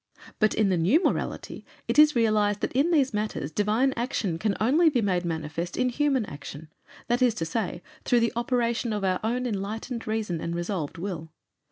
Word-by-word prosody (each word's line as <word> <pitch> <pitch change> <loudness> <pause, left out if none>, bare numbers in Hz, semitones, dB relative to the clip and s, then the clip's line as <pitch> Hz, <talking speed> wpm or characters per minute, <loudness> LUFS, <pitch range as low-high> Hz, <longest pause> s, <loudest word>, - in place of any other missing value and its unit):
But 215 -1 +3
in 215 -2 +2
the 180 -2 +1
new 250 - +3
morality - - -2 0.2
it - - +2
is 300 -1 +7
realized 210 -3 +2
that - - -1
in 275 +6 +2
these 285 -7 +2
matters 210 -9 -2
Divine 215 - +1
action 225 -8 -2
can 210 0 0
only 300 +10 +4
be 270 -5 +1
made 185 -5 +1
manifest 165 +1 -4
in 255 0 +2
human 270 -2 +1
action, 145 0 -9 0.4
that 240 +2 +1
is 245 -3 +3
to 165 - -2
say 175 0 -3 0.2
through 240 -1 +3
the 230 - +1
operation 235 -1 0
of 205 -1 -2
our 185 -1 +1
own 245 +3 -1
enlightened 225 +3 -4
reason 215 -7 -2
and 170 0 -3
resolved 175 -3 -3
will. 170 -3 -5
215 Hz, 190 wpm, -26 LUFS, 180-245 Hz, 0.4 s, is